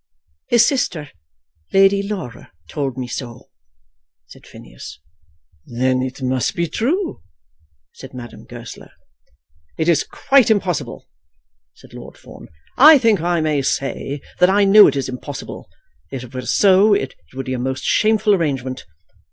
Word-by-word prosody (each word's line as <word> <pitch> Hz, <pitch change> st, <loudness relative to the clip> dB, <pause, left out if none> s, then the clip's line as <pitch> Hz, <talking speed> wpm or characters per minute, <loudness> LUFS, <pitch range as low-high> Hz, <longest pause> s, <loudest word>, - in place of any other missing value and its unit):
"His 235 Hz, -1 st, +4 dB
sister, 170 Hz, -, -2 dB, 0.6 s
Lady 195 Hz, +1 st, +4 dB
Laura, 200 Hz, -, -7 dB, 0.2 s
told 135 Hz, -, -4 dB
me 130 Hz, -, -3 dB
so," 120 Hz, -1 st, -8 dB, 0.7 s
said -, -, -17 dB
Phineas. -, -, -12 dB, 0.7 s
"Then 130 Hz, +2 st, 0 dB
it 130 Hz, +1 st, -5 dB
must 130 Hz, -1 st, -1 dB
be 170 Hz, -, 0 dB
true," 325 Hz, -, -2 dB, 0.7 s
said -, -, -12 dB
Madame 120 Hz, -2 st, -11 dB
Goesler. -, -, -11 dB, 0.9 s
"It 160 Hz, -, -1 dB
is 165 Hz, -3 st, +3 dB
quite 270 Hz, -3 st, +2 dB
impossible," 180 Hz, -, -2 dB, 0.7 s
said -, -, -19 dB
Lord -, -, -11 dB
Fawn. -, -, -14 dB, 0.3 s
"I 305 Hz, +3 st, +9 dB
think 225 Hz, -, +2 dB
I 170 Hz, -1 st, 0 dB
may 155 Hz, -2 st, 0 dB
say 135 Hz, +1 st, -3 dB, 0.2 s
that 180 Hz, -, +5 dB
I 200 Hz, +1 st, +3 dB
know 205 Hz, +1 st, +8 dB
that 140 Hz, -, +2 dB
it -, -, -2 dB
is 135 Hz, -, -2 dB
impossible. 130 Hz, +2 st, -8 dB, 0.4 s
If 135 Hz, -2 st, -6 dB
it 125 Hz, -, -13 dB
were 130 Hz, -1 st, -6 dB
so, 200 Hz, +1 st, +4 dB
it 200 Hz, -, -3 dB, 0.2 s
would 135 Hz, 0 st, -5 dB
be 130 Hz, -, -3 dB
a 125 Hz, -, -3 dB
most 130 Hz, +1 st, -3 dB
shameful 215 Hz, -1 st, +2 dB
arrangement. 135 Hz, -, -2 dB
155 Hz, 145 wpm, -19 LUFS, 130-205 Hz, 0.9 s, I